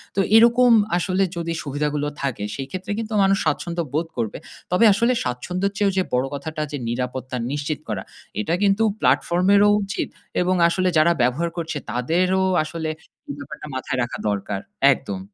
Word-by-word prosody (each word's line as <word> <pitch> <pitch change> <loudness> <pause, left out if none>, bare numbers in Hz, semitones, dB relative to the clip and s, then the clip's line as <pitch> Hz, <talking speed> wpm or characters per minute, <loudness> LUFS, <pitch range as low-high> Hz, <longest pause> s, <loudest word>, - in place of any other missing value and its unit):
তো - - 0 0.2
এরকম 235 +2 +6 0.3
আসলে 185 +2 +1
যদি 165 0 -2
সুবিধাগুলো 145 +1 -2
থাকে 135 -7 -2
সেইক্ষেত্রে 180 - -5
কিন্তু 220 -1 -4
মানুষ 195 0 +3
স্বাচ্ছন্দ্য 170 +3 -1
বোধ 160 +3 0
করবে। 115 -3 -2 0.3
তবে 180 +6 +4
আসলে 235 +5 +2
স্বাচ্ছন্দ্যের 180 +10 -2
চেয়েও 205 -1 +2
যে 190 - +3
বড় 125 +1 +2
কথাটা 155 +2 -5
যে 145 - -3
নিরাপত্তা 125 +1 -3
নিশ্চিত 145 +1 -2
করা। 100 -3 -3 0.4
এটা 160 - -1
কিন্তু 200 +2 +3 0.2
platform 180 +2 +2
এর 200 - +6
ও - - +5
উচিত 195 +1 -3 0.3
এবং 185 +1 +2
আসলে 185 +2 +1
যারা 165 +2 +5
ব্যবহার 130 +8 +1
করছে 165 -2 -3
তাদেরও 180 +10 +1 0.2
আসলে 160 0 -4 0.4
এই - - -4
ব্যাপারটা 140 +2 -8
মাথায় 130 0 -3
রাখা 120 - -5
দরকার। 100 -1 -2 0.3
একদম। 100 -7 -6
160 Hz, 165 wpm, -22 LUFS, 130-185 Hz, 0.4 s, এরকম